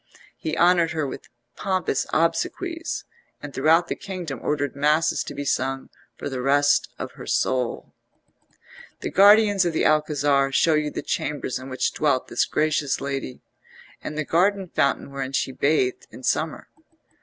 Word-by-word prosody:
He 155 0 -4
honoured 175 -1 +4
her 155 -2 -1
with 135 - -8 0.3
pompous 185 -8 -1
obsequies, 335 - -1 0.4
and 145 -1 -9
throughout 160 +5 +3
the - - -2
kingdom 175 -9 -6
ordered 145 -3 -1
masses 150 +3 +2
to 145 - -7
be 145 +1 -4
sung 135 0 -1 0.3
for - - -5
the 130 -2 -4
rest 145 +2 +3
of - - -6
her - - -11
soul. 125 -2 -1 1.1
The - - -4
guardians 205 0 +6
of 170 -2 -1
the - - +1
Alcazar 145 -2 +2
show 160 +4 +3
you 150 -1 +1
the - - -5
chambers 145 -4 -2
in 130 +1 -9
which 130 -1 -1
dwelt 140 -4 0
this - - +1
gracious 150 -2 0
lady, 135 -2 -4 0.6
and 150 - -5
the 155 - -1
garden 190 +3 +1
fountain 140 -1 0
wherein 135 -1 -5
she 135 - 0
bathed 130 -1 0
in 130 - -13
summer. 155 +4 -1
150 Hz, 155 wpm, -24 LUFS, 135-165 Hz, 1.1 s, guardians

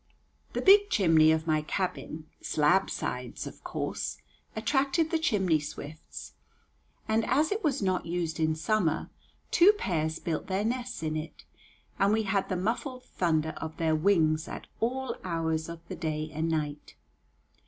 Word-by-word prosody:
The - - -2
big 405 +1 +7
chimney 160 -5 +5
of 160 0 +1
my 155 -1 +2
cabin 160 -1 -3 0.2
"Slabsides" 150 -6 0
of - - -10
course - - -3 0.4
attracted 280 +8 +1
the 330 - +2
chimney 190 - +2
swifts, 150 +1 -8 0.7
and 220 +1 +2
as 295 +7 +2
it 415 +1 -1
was 280 -8 +1
not 185 -3 0
used 165 -2 -2
in 155 0 +2
summer, 165 -1 0 0.4
two 370 +4 +7
pairs 160 - -1
built 160 -3 -3
their 195 +2 0
nests 245 -4 -2
in 155 0 -1
it, 155 0 -6 0.5
and 200 +1 +4
we 220 0 +2
had 195 -1 0
the 185 - 0
muffled 250 +6 -2
thunder 160 -7 0
of 160 0 -6
their 160 -1 +2
wings 155 -2 +3
at - - -7
all 260 +3 -1
hours 165 -2 -1
of 170 0 -9
the - - -5
day 155 -1 -3
and 160 +2 -1
night. 150 -2 -3
170 Hz, 155 wpm, -29 LUFS, 155-220 Hz, 0.7 s, big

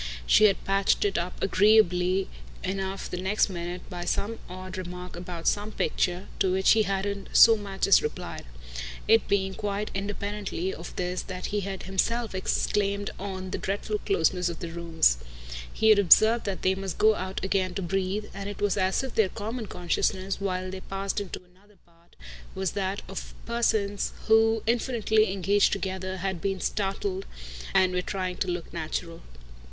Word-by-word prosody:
She 215 - +6
had 200 -2 +3
patched 195 +1 +2
it 200 - 0
up 175 +1 -4
agreeably 190 -2 +4 0.4
enough 195 0 -3
the 180 - -5
next 205 +3 +2
minute 175 0 -5
by 175 -2 -6
some 220 +5 -2
odd 185 +1 -7
remark 180 0 -6
about 175 -1 -6
some 210 +1 +1
picture, 180 -2 -1
to 190 -2 +2
which 190 +1 +4
he 220 - +5
hadn't 200 0 -2
so 225 0 +9
much 200 -2 -2
as 195 - +6
replied; 150 - -5 0.6
it 225 0 +5
being 190 -1 +1
quite 205 0 -3
independently 200 -2 -3
of 170 - -9
this 180 0 -2
that 185 -1 -6
he 210 - +2
had 195 -1 -5
himself 225 +4 0
exclaimed 200 +1 0
on 190 -1 -5
the - - -2
dreadful 205 +2 -2
closeness 180 -1 +1
of 170 - -5
the 170 - -6
rooms. 165 - +2 0.5
He 220 - +2
had 215 -2 +7
observed 220 +5 +6
that 195 -2 -3
they 185 - +3
must 190 -2 -5
go 220 0 +5
out 190 -1 -4
again 190 -2 0
to 195 - -2
breathe; 195 +3 -1
and 200 +1 -5
it 205 - -7
was 205 -1 +1
as 190 +5 +1
if 265 - -5
their 215 -4 +3
common 220 +3 -5
consciousness, 185 +2 -1
while 185 -1 -2
they 190 - -6
passed 195 +1 -3
into 190 -2 -7
another 190 +3 -25
part, 170 0 -27 0.4
was 190 -1 -1
that 195 0 -2
of 195 +1 -7
persons 215 -4 0
who, 225 0 +4
infinitely 225 -3 +2
engaged 200 +1 +3
together, 190 -1 -3
had 190 -2 -3
been 195 -1 -1
startled 370 - -2 0.5
and 185 -1 +4
were 180 - +1
trying 185 -1 -3
to - - -1
look 175 -2 -4
natural. 165 +1 -4
195 Hz, 170 wpm, -27 LUFS, 185-205 Hz, 0.6 s, so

